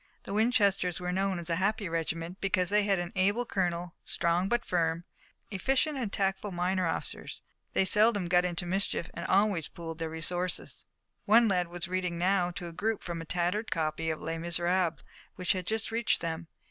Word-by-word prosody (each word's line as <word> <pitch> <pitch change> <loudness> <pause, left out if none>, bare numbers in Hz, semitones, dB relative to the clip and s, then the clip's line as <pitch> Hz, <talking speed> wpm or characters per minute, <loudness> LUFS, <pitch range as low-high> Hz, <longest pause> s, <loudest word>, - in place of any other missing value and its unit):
The - - -6
Winchesters 200 -5 +2
were 180 0 -2
known 190 0 0
as 170 -1 -6
a 165 - +2
happy 200 +2 0
regiment, 165 +2 -3
because 185 -2 +1
they 210 0 +4
had 200 -2 +3
an 175 0 -3
able 200 +6 +2
colonel, 175 -4 -1
strong 170 +3 +1
but 240 +1 +1
firm, 165 -1 0 0.5
efficient 270 - +1
and 240 -7 -2
tactful 195 +1 -1
minor 180 0 0
officers. 165 - -4 0.3
They 190 - +3
seldom 210 -1 +4
got 175 +1 +4
into 175 -1 -1
mischief, 185 -1 -1
and 170 - -5
always 195 -5 +3
they - - -26
pooled 165 -1 -6
their 165 -1 -2
resources. 175 +3 -3 0.4
One 230 +2 +6
lad 180 -3 +1
was 175 0 -4
reading 180 -2 -1
now 180 0 +2
to 180 0 -6
a - - -7
group 220 +5 -1
from 170 -1 -4
a - - -7
tattered 180 +6 -1
copy 160 0 -1
of 155 - -2
"Les 165 0 -3
Miserables," 170 0 0 0.3
which 180 -1 0
had 185 -2 -2
just 220 0 -1
reached 230 0 +2
them. 165 0 -4
180 Hz, 190 wpm, -30 LUFS, 170-200 Hz, 0.5 s, One